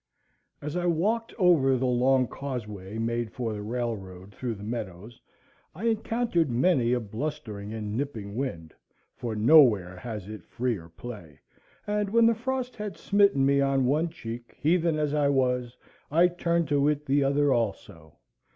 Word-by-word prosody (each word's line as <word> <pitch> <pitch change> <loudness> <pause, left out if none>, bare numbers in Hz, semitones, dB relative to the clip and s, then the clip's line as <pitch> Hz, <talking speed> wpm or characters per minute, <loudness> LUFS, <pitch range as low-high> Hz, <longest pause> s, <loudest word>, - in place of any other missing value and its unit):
As 150 +2 -4
I 175 0 0
walked 210 +8 0
over 160 - +4
the 130 - -1
long 130 +1 +3
causeway 105 -7 -6
made 115 0 -2
for 115 -3 -3
the 105 - -5
railroad 105 -5 -5
through 120 0 -4
the 100 - -10
meadows, 110 -1 -6 0.5
I 185 - -8
encountered 225 - +1
many 125 0 +2
a 125 - +2
blustering 110 -3 -5
and 105 -1 -4
nipping 110 -7 -4
wind, 100 - -4 0.4
for 115 -3 -4
nowhere 105 - +5
has 105 -2 -6
it 110 0 -8
freer 115 -9 -3
play; 85 - -10 0.5
and 210 -1 -1
when 230 +2 +4
the 230 - +5
frost 255 +2 -3
had 210 -2 -5
smitten 200 -9 +3
me 140 0 +3
on 135 -1 +2
one 155 +6 +1
cheek, 120 -6 -8
heathen 165 +1 +2
as 150 -1 0
I 145 -1 +2
was, 125 -2 0 0.3
I 170 +4 +4
turned 170 -2 0
to 145 0 +3
it 150 0 0
the 140 +1 +2
other 140 0 +3
also. 95 - -4
130 Hz, 160 wpm, -27 LUFS, 110-160 Hz, 0.5 s, nowhere